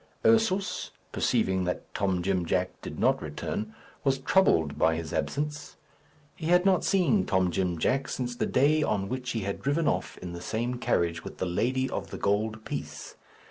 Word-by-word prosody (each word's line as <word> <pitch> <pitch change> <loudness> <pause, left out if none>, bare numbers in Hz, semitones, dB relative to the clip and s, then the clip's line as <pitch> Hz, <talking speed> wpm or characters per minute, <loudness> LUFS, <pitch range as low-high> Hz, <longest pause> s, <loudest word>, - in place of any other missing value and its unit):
Ursus, 220 -4 +2 0.2
perceiving 95 -1 +1
that 90 - -4
Tom 95 -4 0
Jim 95 -1 +1
Jack 90 +2 -1
did - - -7
not - - +2
return, 110 +1 -4 0.3
was 135 -1 +2
troubled 130 - +3
by 80 0 +4
his 80 0 -5
absence. 150 - -3 0.6
He 160 - -5
had 180 +2 +4
not 190 -2 +4
seen 195 +1 +3
Tom 95 -2 +2
Jim 90 -1 0
Jack 135 +11 +1
since 125 -1 -3
the - - -1
day 150 +4 +3
on 100 -8 0
which 125 0 -3
he 115 - -1
had 100 0 -3
driven 150 +3 +1
off - - -1
in 90 -1 -7
the 85 - -7
same 120 +6 -2
carriage 85 -7 0
with - - -8
the - - -1
lady 125 +9 0
of - - -4
the - - -6
gold 110 +2 0
piece. - - -6
110 Hz, 180 wpm, -28 LUFS, 90-145 Hz, 0.6 s, by